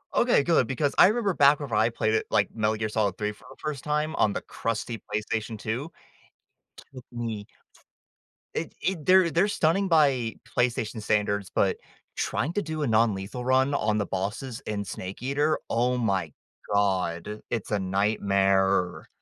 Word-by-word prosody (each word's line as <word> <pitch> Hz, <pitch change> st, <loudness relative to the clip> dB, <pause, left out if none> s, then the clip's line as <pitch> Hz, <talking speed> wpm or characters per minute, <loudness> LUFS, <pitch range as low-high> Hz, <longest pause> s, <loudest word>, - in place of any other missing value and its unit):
Okay, 240 Hz, -10 st, +4 dB
good, 160 Hz, -6 st, +3 dB
because 140 Hz, +3 st, -1 dB
I -, -, +9 dB
remember 210 Hz, -2 st, +1 dB
back 145 Hz, -1 st, +5 dB
when 145 Hz, -4 st, -6 dB
I 110 Hz, +1 st, +3 dB
played 110 Hz, -1 st, -1 dB
it, 110 Hz, -, +1 dB
like, 100 Hz, -, +2 dB
Metal 110 Hz, -1 st, +1 dB
Gear 110 Hz, 0 st, -2 dB
Solid 105 Hz, -3 st, 0 dB
3 105 Hz, 0 st, -2 dB
for -, -, -20 dB
the -, -, -14 dB
1st 150 Hz, -4 st, -4 dB
time 150 Hz, +1 st, -1 dB
on 105 Hz, -, +3 dB
the -, -, -3 dB
crusty 115 Hz, 0 st, -4 dB
PlayStation 110 Hz, +1 st, -2 dB
2, 125 Hz, +10 st, -4 dB, 1.0 s
took 130 Hz, -2 st, -10 dB
me 115 Hz, -4 st, -5 dB, 1.1 s
f 165 Hz, -, -1 dB
it -, -, -25 dB
it 180 Hz, -6 st, -2 dB
they're 185 Hz, -2 st, +5 dB
they're 175 Hz, +5 st, +3 dB
stunning 195 Hz, 0 st, +1 dB
by 140 Hz, -9 st, +3 dB, 0.2 s
PlayStation 120 Hz, -3 st, 0 dB
standards, 105 Hz, -2 st, 0 dB
but -, -, +2 dB, 0.4 s
trying 160 Hz, -, -1 dB
to 205 Hz, -, 0 dB
do 155 Hz, -2 st, -3 dB
a -, -, 0 dB
non-lethal 110 Hz, 0 st, +1 dB
run 130 Hz, +2 st, +2 dB
on 110 Hz, -6 st, +1 dB
the 105 Hz, -, 0 dB
bosses 105 Hz, +7 st, -4 dB
and 100 Hz, -1 st, -2 dB
Snake 95 Hz, +3 st, -7 dB
Eater, 145 Hz, +4 st, +1 dB
oh 125 Hz, +2 st, +1 dB
my 95 Hz, -9 st, 0 dB, 0.4 s
god, 100 Hz, -1 st, 0 dB
it's 115 Hz, -3 st, -3 dB
a 105 Hz, -, +1 dB
nightmare. 95 Hz, -1 st, +1 dB
115 Hz, 170 wpm, -26 LUFS, 105-145 Hz, 1.1 s, I